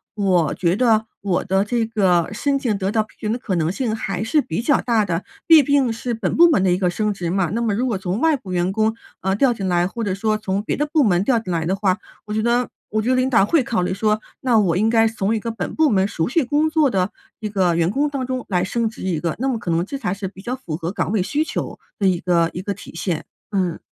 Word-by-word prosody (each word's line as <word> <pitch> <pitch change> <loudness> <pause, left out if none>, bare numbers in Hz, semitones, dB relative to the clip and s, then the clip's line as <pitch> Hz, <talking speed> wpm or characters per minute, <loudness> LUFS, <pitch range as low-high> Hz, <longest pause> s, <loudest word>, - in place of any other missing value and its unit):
我 185 -7 +2
觉 175 0 +1
得 220 -1 +3 0.2
我 190 -3 0
的 190 0 +2
这 230 +2 0
个 185 -7 +2
申 275 +5 0
请 230 -6 0
得 195 0 -1
到 220 0 +2
批 215 - -22
准 215 - -1
的 235 - -2
可 200 -6 -2
能 165 -1 +1
性 220 +1 -2
还 200 -3 -3
是 300 +7 +2
比 240 -3 -3
较 280 +4 +2
大 230 -3 +2
的， 175 -1 -2 0.2
毕 320 -3 +8
竟 270 -3 +2
是 235 +1 -3
本 220 -5 -2
部 340 +1 +7
门 290 - +3
的 185 - +3
一 - - +1
个 180 -1 +1
升 210 +3 -1
职 180 -4 -4
嘛。 185 -1 0
那 230 - -1
么 225 -3 0
如 245 +6 0
果 225 -5 -1
从 185 +2 -3
外 320 +2 +3
部 205 -9 -8
员 180 +1 0
工， 220 +1 +1 0.3
呃， 190 0 0
调 250 +3 +3
进 200 -4 -5
来， 175 0 +2
或 230 +4 -5
者 200 -3 -1
说 215 +2 0
从 200 -2 -2
别 210 - -2
的 295 - 0
部 310 -3 +4
门 180 -3 +2
调 235 +2 +2
进 220 -5 -6
来 165 -1 -1
的 180 - 0
话， 195 -2 +1 0.3
我 210 - -5
觉 215 0 0
得 240 +1 +1 0.2
我 215 - 0
觉 225 - -1
得 255 - +3
领 255 +1 +2
导 225 -6 +4
会 300 +5 +2
考 230 -4 -1
虑 180 - -1
说， 215 +2 +1 0.2
那 245 -4 +3
我 180 -5 +2
应 215 +5 +2
该 225 -1 +4
从 220 -1 -1
一 225 - 0
个 230 +2 -4
本 210 -5 -5
部 315 -1 +3
门 190 -5 +3
熟 170 -5 -2
悉 310 +5 +2
工 295 +5 +1
作 310 -3 +3
的 190 -3 0 0.3
一 215 - -3
个 190 -4 +1
员 165 0 +2
工 285 +8 0
当 275 -3 -3
中 255 -1 -3
来 180 -3 +1
升 230 +3 -1
职 215 - -11
一 175 -5 -1
个， 170 -2 -1
那 265 - 0
么 260 -3 0
可 180 -5 -4
能 165 +1 +1
这 275 - -5
才 180 -9 -2
是 200 0 -5
比 190 0 -11
较 240 +5 -4
符 170 -12 -5
合 165 +2 -4
岗 200 - -2
位 205 -4 +2
需 295 +10 0
求 - - -4 0.2
的 200 - -1
一 180 -2 +2
个 170 -2 +2
一 180 - -4
个 200 +1 -3
体 - - -12
现， 165 -1 -2 0.3
嗯。 185 -5 -1
210 Hz, 305 characters per minute, -21 LUFS, 185-240 Hz, 0.3 s, 毕